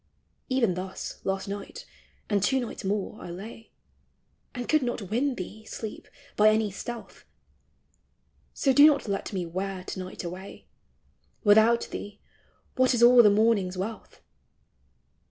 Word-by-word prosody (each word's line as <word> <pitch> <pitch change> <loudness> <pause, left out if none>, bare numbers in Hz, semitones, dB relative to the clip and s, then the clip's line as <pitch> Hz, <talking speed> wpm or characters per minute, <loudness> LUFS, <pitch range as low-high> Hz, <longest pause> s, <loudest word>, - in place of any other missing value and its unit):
Even 250 -7 +2
thus 185 +1 -6
last 195 0 -2
night, 205 - -7 0.4
and 205 -2 +1
two 265 +7 +2
nights 240 -3 -6
more, 200 0 -3
I - - -8
lay, 215 +6 -9 0.9
And 245 -1 -5
could 310 -1 +3
not 235 -6 -4
win 260 +4 +1
thee, 210 +3 -8
Sleep, 220 -1 -7 0.3
by 215 +1 +6
any 215 -1 +1
stealth: 235 +4 -8 1.3
So 270 - +1
do 285 +3 +8
not 285 -5 +2
let 200 -1 -3
me 185 -4 -3
wear 185 +2 -4
to 185 - -6
night 185 0 -7
away; 185 +3 -8 0.8
Without 220 +3 +5
thee 205 0 -7 0.6
what 255 0 +3
is 235 - +2
all 245 0 +9
the 210 - +6
morning's 205 -3 +2
wraith? 215 +4 -6
210 Hz, 140 wpm, -27 LUFS, 190-240 Hz, 1.3 s, all